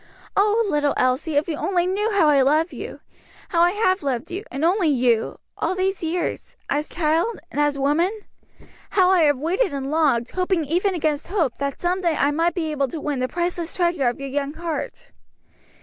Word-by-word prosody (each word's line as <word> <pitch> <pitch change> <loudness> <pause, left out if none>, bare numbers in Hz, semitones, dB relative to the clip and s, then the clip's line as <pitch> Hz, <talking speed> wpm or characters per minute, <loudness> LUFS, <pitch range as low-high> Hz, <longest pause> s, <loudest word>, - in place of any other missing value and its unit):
Oh, 425 +3 +3
little 295 -5 +1
Elsie, 255 +5 +1
if 290 +2 +2
you 325 - -2
only 360 0 0
knew 400 +4 0
how 385 -6 +3
I 285 -2 +5
love 310 +6 +2
you; - - -8 0.5
how 335 - +2
I 345 - +6
have 375 -3 +1
loved 270 +3 -3
you, 380 +4 -4
and 275 +4 -2
only 360 0 +2
you, 245 -5 +1 0.2
all 375 - 0
these 380 +1 -1
years 340 +1 -3 0.2
as 295 +2 -1
child 330 +7 0
and 295 - 0
as 295 -1 +1
woman 295 +6 +2 0.9
how 370 -1 +5
I 370 -2 +4
have 290 -2 +3
waited 340 - 0
and 275 0 -4
longed, 285 -7 +2
hoping 365 -3 0
even 360 +6 0
against 305 -3 -1
hope, 340 - -1
that 280 -1 -3
some 360 +2 0
day 340 -3 +1
I 285 - +2
might 330 +4 +1
be 320 -3 -2
able 280 -2 0
to 310 +5 -6
win 290 -2 -2
the 255 - 0
priceless 345 +1 -2
treasure 345 -7 +1
of 240 - -1
your 275 0 -5
young 285 +2 -2
heart." 330 -1 -5
320 Hz, 200 wpm, -22 LUFS, 285-360 Hz, 0.9 s, I